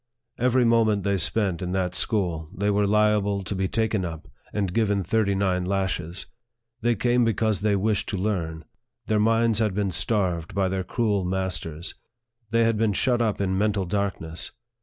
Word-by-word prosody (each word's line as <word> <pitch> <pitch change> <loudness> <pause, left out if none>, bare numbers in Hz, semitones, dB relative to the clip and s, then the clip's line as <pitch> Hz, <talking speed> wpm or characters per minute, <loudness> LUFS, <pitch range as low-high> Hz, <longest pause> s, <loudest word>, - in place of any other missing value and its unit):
Every 125 0 +3
moment 110 -3 +3
they 100 0 +1
spent 95 0 +1
in 90 0 -3
that 90 -1 0
school, 85 -6 0
they 100 +2 +1
were 100 0 +2
liable 105 -1 +2
to 95 - -4
be 95 0 -1
taken 110 -1 0
up, 80 -4 -6 0.2
and 100 -4 -2
given 100 -3 +1
thirty 100 +2 +1
nine 95 -2 +1
lashes. 90 -2 -2 0.6
They 120 +1 +2
came 120 +3 +2
because 110 -3 +1
they 105 -1 +2
wished 105 +1 0
to 100 - -2
learn. 85 -5 -2 0.4
Their 110 -1 +1
minds 115 0 +3
had 105 -4 +1
been 100 -2 0
starved 90 -5 -1
by 95 -1 +1
their 95 0 -2
cruel 105 -3 0
masters. 90 -3 -2 0.6
They 115 +1 +3
had 115 -1 +2
been 110 -1 +2
shut 120 +4 +2
up 110 -3 0
in 95 -1 0
mental 105 -2 +1
darkness. 90 -4 -2
100 Hz, 175 wpm, -25 LUFS, 95-110 Hz, 0.6 s, Every